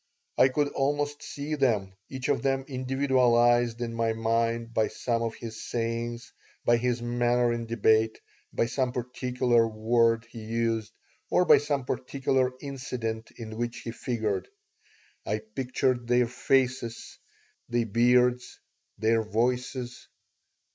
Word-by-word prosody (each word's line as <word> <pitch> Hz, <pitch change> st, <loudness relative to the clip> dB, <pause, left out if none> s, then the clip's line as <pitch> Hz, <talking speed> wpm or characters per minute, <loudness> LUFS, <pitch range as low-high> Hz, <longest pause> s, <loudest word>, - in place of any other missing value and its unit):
I 130 Hz, -, +6 dB
could 145 Hz, +2 st, 0 dB
almost 145 Hz, +1 st, -1 dB
see 145 Hz, +2 st, -5 dB
them, 110 Hz, -10 st, +1 dB, 0.2 s
each 130 Hz, -1 st, -4 dB
of 140 Hz, -, +1 dB
them 135 Hz, -1 st, 0 dB
individualized 125 Hz, -3 st, +2 dB
in 115 Hz, -1 st, -3 dB
my 115 Hz, -1 st, 0 dB
mind 115 Hz, +1 st, 0 dB
by 110 Hz, -1 st, +2 dB
some 115 Hz, +2 st, -2 dB
of 115 Hz, -1 st, -2 dB
his 110 Hz, -1 st, -8 dB
sayings, 115 Hz, 0 st, -3 dB, 0.3 s
by 120 Hz, -, +5 dB
his 120 Hz, 0 st, -1 dB
manner 120 Hz, 0 st, +2 dB
in 115 Hz, -1 st, -4 dB
debate, 110 Hz, -1 st, +2 dB, 0.3 s
by -, -, +1 dB
some 125 Hz, +1 st, -1 dB
particular 125 Hz, -1 st, +1 dB
word 115 Hz, +1 st, +2 dB
he 115 Hz, -, -8 dB
used, 115 Hz, -1 st, -1 dB, 0.4 s
or 180 Hz, -, +3 dB
by -, -, +7 dB
some 145 Hz, -3 st, -2 dB
particular 130 Hz, 0 st, 0 dB
incident 125 Hz, -5 st, -4 dB
in 110 Hz, -2 st, -7 dB
which 120 Hz, 0 st, -3 dB
he 115 Hz, -, -5 dB
figured. 110 Hz, -6 st, -2 dB, 0.8 s
I 105 Hz, -, -1 dB, 0.2 s
pictured 125 Hz, -1 st, 0 dB
their 125 Hz, 0 st, +4 dB
faces, 125 Hz, -1 st, -1 dB, 0.5 s
their 120 Hz, 0 st, +1 dB
beards, 125 Hz, +3 st, +2 dB, 0.4 s
their 115 Hz, +1 st, +2 dB
voices. 125 Hz, +3 st, -2 dB
120 Hz, 130 wpm, -28 LUFS, 115-130 Hz, 0.8 s, by